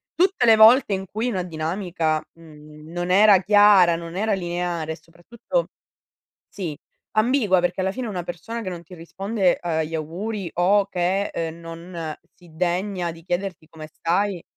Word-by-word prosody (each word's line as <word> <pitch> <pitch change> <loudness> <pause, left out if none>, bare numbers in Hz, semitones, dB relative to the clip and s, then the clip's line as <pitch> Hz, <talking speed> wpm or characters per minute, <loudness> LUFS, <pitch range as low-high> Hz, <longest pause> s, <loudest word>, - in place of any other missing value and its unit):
tutte 370 -6 +2
le 225 - +7
volte 220 0 +7
in 190 0 -3
cui 215 +6 -3
una 185 -6 -2
dinamica, 165 -1 -2
mhmm, 150 -1 -15
non 175 +1 -3
era 200 -1 +6
chiara, 205 -4 +6
non 170 0 -7
era 215 +3 0
lineare 175 -3 -3
e - - -11
soprattutto 175 - -5 0.8
sì, 165 -7 -6 0.3
ambigua 215 -4 +3
perché 175 +1 -1
alla 190 +1 0
fine 255 +1 -5
una 185 -4 -4
persona 200 +8 -6
che 195 - -5
non 175 -2 -7
ti 175 +2 -13
risponde 190 +3 -1
agli 160 -2 -2
auguri 180 +5 -4
o 195 +3 +3
che, 185 +2 0
uhm, 165 0 -4
non 165 -1 -7 0.2
si 175 -1 -19
degna 180 +1 -1
di 165 0 -15
chiederti 175 -3 -4
come 155 -1 -10
stai, 185 +1 -1
180 Hz, 160 wpm, -23 LUFS, 165-200 Hz, 0.8 s, le